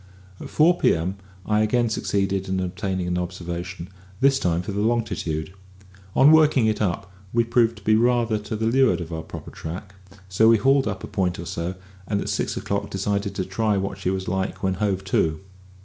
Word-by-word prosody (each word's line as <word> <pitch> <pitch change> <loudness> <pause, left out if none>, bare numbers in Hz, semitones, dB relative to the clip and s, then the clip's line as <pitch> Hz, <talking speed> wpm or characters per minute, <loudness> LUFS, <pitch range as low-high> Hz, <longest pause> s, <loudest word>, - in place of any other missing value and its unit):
At - - -8
four 170 +3 +4
p.m. 90 +4 +1 0.3
I 105 0 +2
again 120 +2 +2
succeeded 95 -3 -1
in 95 0 0
obtaining 95 0 -2
an 90 0 0
observation, 90 0 -5 0.3
this 135 0 +3
lime 85 0 +1
for 100 - -5
the 100 +1 -2
longitude. 95 -8 -1 0.6
On 140 +3 +7
working 155 -6 +5
it 110 -1 0
up, 95 -1 -2 0.2
we 115 0 +3
proved 115 -1 +2
to 105 - -14
be 110 - +3
rather 120 -1 +2
to 105 +1 -5
leeward 115 +4 +2
of 85 -1 -6
our 80 - -3
proper 80 - -9
track; 90 +4 -7 0.3
so 95 +4 +3
we 115 - +6
hauled 135 +3 +3
up 95 -2 -4
a - - -5
point 90 -2 -1
or 85 - -6
so, 85 +1 -4 0.3
and 100 -1 0
at - - -3
six - - -1
o'clock - - -2
decided 100 +1 -2
to 95 - -2
try 105 +2 0
what 95 0 -3
she 90 - -1
was 95 0 -2
like 95 0 -2
when 95 -1 +1
hove 95 0 -1
to. 80 -5 +1
95 Hz, 195 wpm, -24 LUFS, 90-110 Hz, 0.6 s, On